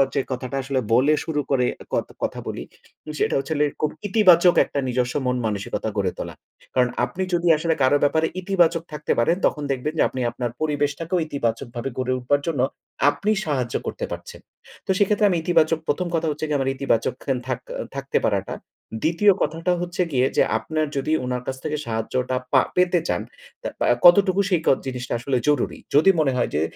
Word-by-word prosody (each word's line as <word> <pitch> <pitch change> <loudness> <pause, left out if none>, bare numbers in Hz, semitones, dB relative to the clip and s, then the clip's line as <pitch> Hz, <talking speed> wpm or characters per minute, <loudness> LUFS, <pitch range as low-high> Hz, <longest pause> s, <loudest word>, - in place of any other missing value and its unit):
যে 140 - +3
কথাটা 130 +1 -4
আসলে 135 0 -1
বলে 135 +6 +4
শুরু 150 -3 -1
করে 130 -2 +3 0.3
কথ - - 0 0.2
কথা - - -2
বলি, - - -4 0.6
যেটা - - +1
হচ্ছে 135 +4 -3
লে 150 - +4 0.2
খুব 155 - +1 0.2
ইতিবাচক 185 -4 +5
একটা 140 - -3
নিজস্ব 125 0 0
মন-মানসিকতা 110 -4 -2
গড়ে 95 -2 +1
তোলা। - - -5 0.4
কারণ 125 -1 +3 0.2
আপনি 170 +10 -4
যদি 175 0 +1
আসলে 160 +1 +1
কারো 130 +2 +4
ব্যাপারে 160 +3 +3
ইতিবাচক 175 -3 +2
থাকতে 150 0 -3
পারেন, 165 +9 +3
তখন 150 - 0
দেখবেন 135 +3 -2
যে, - - +6
আপনি 130 - -4
আপনার 120 0 -3
পরিবেশটাকেও 155 +3 -1
ইতিবাচকভাবে 120 -2 -3
গড়ে 130 0 0
উঠবার 140 +3 +1
জন্য 150 -6 0 0.5
আপনি 205 +8 -1
সাহায্য 130 -6 -2
করতে - - -3
পারছেন। - - -7 0.5
তো - - -25
সেক্ষেত্রে 205 +1 +3
আমি 180 - +1
ইতিবাচক 165 -2 +3
প্রথম 180 +5 0
কথা 160 0 0
হচ্ছে 150 +1 -3
গিয়ে 150 -1 +1
আমার 135 0 0
ইতিবাচক 130 -2 0 0.3
থাক 130 -2 -2 0.4
থাকতে 135 0 -1
পারাটা। 100 -2 -1 0.5
২য় 175 +6 +4
কথাটা 165 +4 0
হচ্ছে 175 +1 -2
গিয়ে, 130 -2 +2
যে - - +6
আপনার 155 -1 -2
যদি 140 +3 -1
উনার 125 0 -3
কাছ 130 - -3
থেকে 150 -1 -2
সাহায্যটা 120 +3 -2 0.2
পা 130 - +7
পেতে 180 -1 +3
চান, 90 - 0 0.4
তা - - -4 0.4
কতটুকু 190 +2 +6
সেই 180 -4 +2
ক - - -5 0.2
জিনিসটা 125 -2 -4
আসলে 130 +2 0
জরুরি। 145 -4 +1 0.2
যদি 155 +6 +6
মনে 145 -4 +3
হয় 120 - +1
যে, 75 - +1
145 Hz, 180 wpm, -23 LUFS, 125-165 Hz, 0.6 s, পা